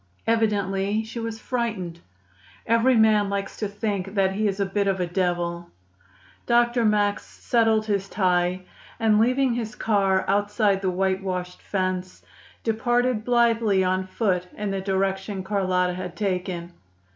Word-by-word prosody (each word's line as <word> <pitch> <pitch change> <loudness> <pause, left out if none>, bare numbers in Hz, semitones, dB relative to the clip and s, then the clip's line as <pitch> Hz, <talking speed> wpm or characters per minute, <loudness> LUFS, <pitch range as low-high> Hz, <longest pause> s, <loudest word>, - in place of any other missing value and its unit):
Evidently 205 -2 +1
she 225 +2 -7
was 225 -1 -4
frightened. 215 -9 -3 0.7
Every 230 +3 +3
man 215 -2 +4
likes 200 0 -3
to 210 - -2
think 200 -1 -3
that 195 -1 +3
he 215 +2 0
is 195 0 -2
a 200 - +2
bit 200 +1 -1
of 190 -1 0
a 180 - +1
devil. 175 -1 -2 0.8
Dr. 240 0 +3
Max 205 -1 +2
settled 225 -2 +1
his 200 -2 -1
tie, 180 -2 +1 0.4
and, 220 -2 +3
leaving 255 +2 +2
his 225 -2 -4
car 195 -4 +1
outside 205 0 +1
the 190 - 0
whitewashed 185 -1 -2
fence, 185 -1 -3 0.4
departed 240 0 +1
blithely 230 -5 +3
on 185 0 0
foot 185 -3 -1
in 210 -1 -2
the 195 -1 -2
direction 195 0 -1
Carlotta 185 -2 0
had 180 -1 -6
taken. 180 -3 -3
200 Hz, 140 wpm, -24 LUFS, 185-220 Hz, 0.8 s, man